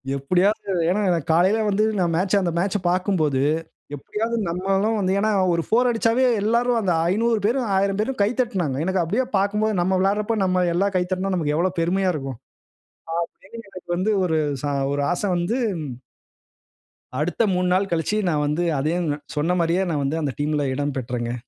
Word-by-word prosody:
எப்பிடியாவது, 180 +10 +1 0.2
ஏன்னா 200 +4 +1
எனக்கு 170 -5 0
காலையில 185 +6 +3
வந்து 205 +1 +2 0.2
நான் 170 -2 +1
மேட்ச் 190 +4 +2
அந்த 180 -3 -1
மேட்ச்ச 195 +3 0
பார்க்கும்போது, 175 -7 +1 0.5
எப்பிடியாவது 225 - -3
நம்மளும் 195 +5 0
வந்து 190 -2 0
ஏன்னா, 215 +1 +1 0.2
ஒரு 170 0 0
4 245 +3 +3
அடிச்சாவே 230 +2 +2 0.2
எல்லாரும் 235 +3 +2
அந்த 190 -4 +1 0.2
500 225 +2 +1
பேரும், 245 +2 0
1000 195 +1 +1
பேரும் 250 +2 -2
கை 200 - +2
தட்டினாங்க. 185 - -1
எனக்கு 190 0 +1
அப்பிடியே 215 +10 0
பார்க்கும்போது 210 +2 0
நம்ம 185 +2 +1
விளையாட்றப்ப 210 +3 +1
நம்ம 185 -1 +1
எல்லாம் 195 +3 +1
கை 180 - +2
தட்னா, 185 +1 -1
நமக்கு 150 -4 0
எவ்ளோ 180 +3 +1
பெருமையா 185 +3 +1
இருக்கும். 135 -5 -5 1.1
அப்பிடின்னு 230 -3 -11
எனக்கு 185 -1 -11
வந்து 195 +5 +1
ஒரு 160 -3 +1 0.2
ச - - -8 0.3
ஒரு 145 0 -1
ஆச 175 - -3
வந்து 175 +8 -1 1.6
அடுத்த 175 +8 0
3 180 0 +1
நாள் 195 +2 +1
கழிச்சு 170 +5 0
நான் 150 -3 0
வந்து 150 +4 0 0.2
அதையும் 165 +4 -1 0.3
சொன்னமாரியே 170 +3 +1
நான் 145 -3 -1
வந்து 145 +4 -1
அந்த 140 -4 -2
டீம்ல 145 -1 0
இடம் 145 0 -2
பெற்றேங்க. 120 -1 -3
185 Hz, 170 wpm, -22 LUFS, 165-210 Hz, 1.6 s, காலையில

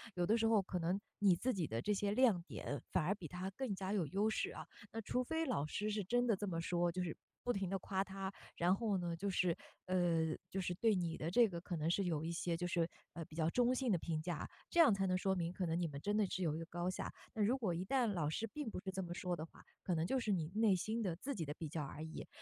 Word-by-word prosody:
有 175 -1 +2
的 220 +5 +4
时 225 - +2
候 220 -2 +5
可 185 -1 -3
能 175 +4 +1 0.2
你 195 -3 +6
自 255 +9 0
己 175 -6 -1
的 115 0 -2
这 210 - +1
些 200 0 0
亮 215 -5 +4
点 145 -4 -4
反 180 - +2
而 185 - +3
比 180 -5 -7
他 180 +3 -4
更 230 0 -2
加 190 0 -3
有 185 -7 +1
优 200 +8 +2
势 220 - 0
啊。 - - -7 0.3
那 225 - -3
除 250 +4 0
非 320 +5 0
老 140 - 0
师 205 +7 -2
是 210 -1 0
真 245 +6 +2
的 225 - +4
这 205 +2 -3
么 165 -3 -1
说， 175 0 +1
就 180 +1 -1
是 165 -3 -3 0.3
不 245 - +1
停 195 -5 -1
地 195 - 0
夸 190 0 0
他， 195 0 -4 0.2
然 180 +2 +4
后 210 -2 +1
呢， 175 -2 -2
就 200 +4 -1
是 180 -3 +2 0.3
呃， 170 -3 +2 0.2
就 195 - -1
是 180 -1 -1
对 220 +3 +3
你 170 -3 -1
的 160 - -2
这 235 +3 +6
个 170 -2 -4
可 175 +1 -4
能 160 0 0
是 195 +3 +2
有 160 -4 0
一 165 - -2
些 170 0 -1
就 175 +1 -2
是， 170 -1 +1 0.3
呃， 165 -1 -5
比 155 - -13
较 160 -1 +2
中 245 +6 +3
性 255 -2 +1
的 185 - +4
评 160 -1 -2
价， 165 -2 -3 0.2
这 345 - +1
样 315 -10 +8
才 195 -1 +1
能 185 0 +2
说 190 +1 +1
明 170 -2 -1
可 185 0 -2
能 165 0 0
你 175 - +1
们 140 -2 -6
真 205 +4 0
的 215 -1 +4
是 185 - -2
有 155 -3 +1
一 - - -3
个 165 - -4
高 175 +1 -2
下。 185 - -3 0.2
那 220 - -2
如 240 +6 +3
果 215 -9 0
一 170 +2 -2
旦 255 +5 +2
老 175 -9 0
师 185 +8 -1
并 295 -6 -3
不 - - -4
是 190 - -4
这 190 0 -2
么 175 -2 -5
说 180 -1 -1
的 155 - -5
话， 165 - -12 0.2
可 180 - 0
能 160 0 +1
就 265 +8 +1
是 215 -4 0
你 165 -4 0
内 215 -3 +5
心 220 +6 -1
的 185 -6 0
自 265 +11 -4
己 190 -10 -3
的 145 - -4
比 160 - -4
较 155 +1 -3
而 145 +2 -6
已。 160 0 -6
185 Hz, 320 characters per minute, -38 LUFS, 170-210 Hz, 0.3 s, 样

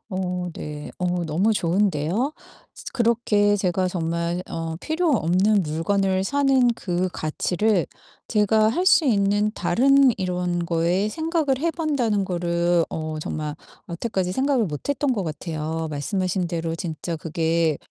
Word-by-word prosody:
어 180 -2 -3
네. 150 -1 -7
어 180 -1 -1
너무 180 +8 +1
좋은데요? 190 - 0 0.4
스 - - -12
그렇게 225 -4 +2
제가 185 -1 0
정말 170 0 -2
어 165 -1 -4
필요 320 +1 0
없는 195 +1 +3
물건을 190 +5 0
사는 270 -1 +3
그 180 -2 -1
가치를 180 +3 0 0.4
제가 215 0 +3
할 350 +11 0
수 320 - +5
있는 205 -3 +2
다른 275 +1 +4
이런 180 -2 -1
거에 175 +5 +1
생각을 315 -2 0
해 335 +1 +1
본다는 255 - 0
거를 175 -1 +1
어 155 -1 -4
정말 150 -1 -4 0.3
여태까지 185 0 -2
생각을 265 0 +1
못 150 - -6
했던 285 -1 +1
것 205 -5 -1
같아요. 160 0 -4
말씀하신 180 +5 -1
대로 165 -1 -2
진짜 165 0 -4
그게 160 -1 0
185 Hz, 265 characters per minute, -23 LUFS, 165-220 Hz, 0.4 s, 수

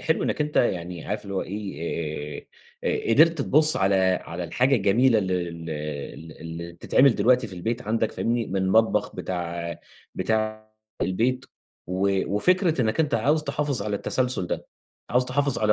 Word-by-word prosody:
حلو 160 - +1
إنّك - - -1
أنت 150 0 -1
يعني 90 -6 0
عارف 105 +1 -3
اللي 100 -1 -6
هو 95 - 0
إيه، 80 -6 -4 0.4
آآ - - +1 0.2
آآ 115 - +5
قدرت 165 +2 +5
تبُص 155 +3 +3
على 95 0 +2 0.3
على 85 +1 -5
الحاجة 130 +11 +2
الجميلة 110 +4 +4
ال 95 -3 -1
ال 85 -2 -3
ال 75 +1 -6
اللي 85 +1 -7
بتتعمل 130 +9 +3
دلوقتي 125 +3 +3
في 100 - -9
البيت 115 +7 -3
عندك 115 +1 0
فاهمني؟ 115 0 -1
من 95 - -3
المطبخ 105 +2 +2
بتاع 85 -2 -4 0.4
بتاع 110 0 -1 0.3
البيت، 125 +7 0 0.4
و 95 +2 +1
وفكرة 180 - +3
إنّك 110 +5 +1
أنت 150 -4 +1
عاوز 145 +8 +2
تحافظ 145 -7 -1
على 105 0 -1
التسلسُل 125 -4 -1
ده، - - -4 0.4
عاوز 125 +1 +3
تحافظ 140 +1 0
على 105 -1 +3
105 Hz, 165 wpm, -25 LUFS, 90-125 Hz, 0.4 s, آآ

